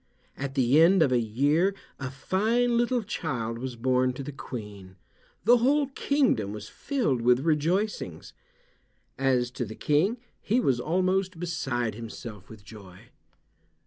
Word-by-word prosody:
At 135 0 -5
the 135 +3 +4
end 175 +1 +6
of 140 - +1
a 125 - +3
year 145 - +1 0.2
a 135 -1 -4
fine 220 - +1
little 240 0 +1
child 115 - -3
was 130 0 -5
born 130 +1 +1
to 135 - -6
the 145 - -6
Queen. 105 -8 -9 0.5
The 240 +4 +6
whole 275 +4 +2
kingdom 265 - +1
was 105 0 -7
filled 225 - -1
with 125 +2 +4
rejoicings. 170 +7 -1 0.9
As 125 -2 +1
to 130 -1 -3
the 110 -1 -7
King 170 +11 +1 0.2
he 230 +5 +1
was 130 - +1
almost 185 +4 0
beside 135 -9 -2
himself 110 -2 -9
with 110 -3 -13
joy. 95 -3 -13
135 Hz, 145 wpm, -27 LUFS, 120-190 Hz, 0.9 s, end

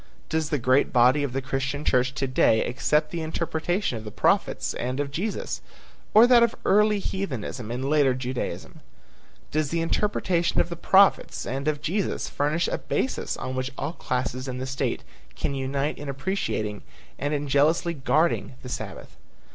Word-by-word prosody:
Does 160 -1 0
the 150 - +1
great 130 +2 +3
body 125 +4 +5
of 140 -3 -1
the 135 +1 -3
Christian 135 +2 -2
church 125 +1 +2
to 135 -1 -1
day 125 -4 +3
accept 150 +5 +1
the 170 - -3
interpretation 160 - -1
of - - -11
the 110 - -6
prophets - - +1
and 125 +3 -3
of 145 -1 -2
Jesus, 195 +9 -3 0.5
or 220 +2 +9
that 245 -1 +6
of 235 -1 +3
early 210 +1 +4
heathenism 135 - -4
and 125 +3 -3
later 140 -3 +3
Judaism? 130 0 -4 0.7
Does 155 -1 0
the 165 - -1
interpretation 175 0 0
of 170 - +2
the 170 - -4
prophets 190 +3 +3
and 135 +3 -3
of 150 -1 -1
Jesus 195 +6 -1
furnish 150 +4 0
a - - -2
basis 265 - -2
on 130 - -4
which 130 +1 -2
all - - -3
classes 130 -3 -3
in 130 -1 -4
the 130 - -3
state 135 0 -2 0.3
can 140 - -2
unite 140 +2 -2
in 145 -1 -6
appreciating 135 - -2 0.4
and 145 +2 0
in 145 0 -3
jealously 155 +5 +2
guarding 155 -1 +1
the 125 - -7
Sabbath? - - -7
145 Hz, 170 wpm, -25 LUFS, 130-170 Hz, 0.7 s, or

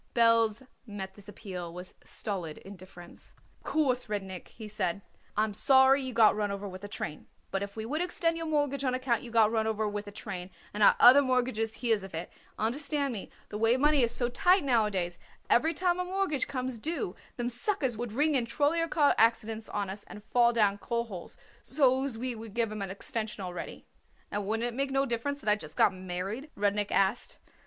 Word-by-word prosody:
Belz 230 0 +4 0.2
met 195 -2 -6
this 205 +1 -14
appeal 185 -4 -7
with 180 +1 -10
stolid 180 -7 -3
indifference. 185 -2 -13 0.3
"Of - - -33
course, 260 -5 +1
Rudnik," 190 -3 -4
he 220 -2 -10
said, 200 -3 -2 0.3
"I'm 215 0 +1
sorry 265 +4 +5
you 260 -1 -4
got 225 -3 +5
run 210 -1 -1
over 200 0 -4
with 185 0 -9
a - - -5
train; 155 -7 -5 0.2
but 195 - -1
if 200 0 -5
we 220 0 -4
would 300 +8 -2
extend 335 -2 +1
your 330 0 -4
mortgage 290 -3 0
on 255 -1 +1
account 255 -3 0
you 240 - -9
got 225 -2 +4
run 220 -1 +1
over 220 -1 0
with 205 0 -4
a - - -7
train 190 -3 -6 0.2
and 210 - -4
our 205 - +7
other 260 +4 +9
mortgagees 250 -4 0
hears 225 -4 +1
of 190 -3 -8
it, 165 - -5 0.3
understand 280 +4 0
me, 200 - -6 0.2
the 210 - -5
way 225 +3 +3
money 295 +1 +4
is 235 -1 +2
so 240 - +1
tight 355 +9 +3
nowadays, 210 -9 +1 0.3
every 315 +7 +4
time 355 +2 0
a - - +1
mortgage 370 -5 -1
comes 255 -3 -3
due 305 - -3 0.2
them 240 -1 -1
suckers 255 - +1
would 235 0 -4
ring 295 +7 +2
in 245 -4 +1
trollyer 300 +7 +1
car 290 -3 +4
accidents 225 -1 +2
on 205 -1 -2
us 195 +2 -6
and 210 - -11
fall 240 +1 +3
down 205 -4 +2
coal 235 +1 -1
holes 195 -7 -9 0.2
so 265 0 +2
as 270 -5 -3
we 250 +2 -2
would 225 -2 -9
give 230 -2 +1
'em 215 -1 -5
an 195 - -3
extension 215 +1 -4
already." 180 -2 -7 0.5
"And 205 -1 -2
wouldn't 225 +2 0
it 240 - -4
make 275 +1 0
no 270 0 +1
difference 280 +4 -2
that 215 - -1
I - - +6
just 155 -7 -9
got 195 - +5
married?" 185 - -5
Rudnik 205 0 0
asked. 195 +4 +1
225 Hz, 210 wpm, -29 LUFS, 205-265 Hz, 0.5 s, other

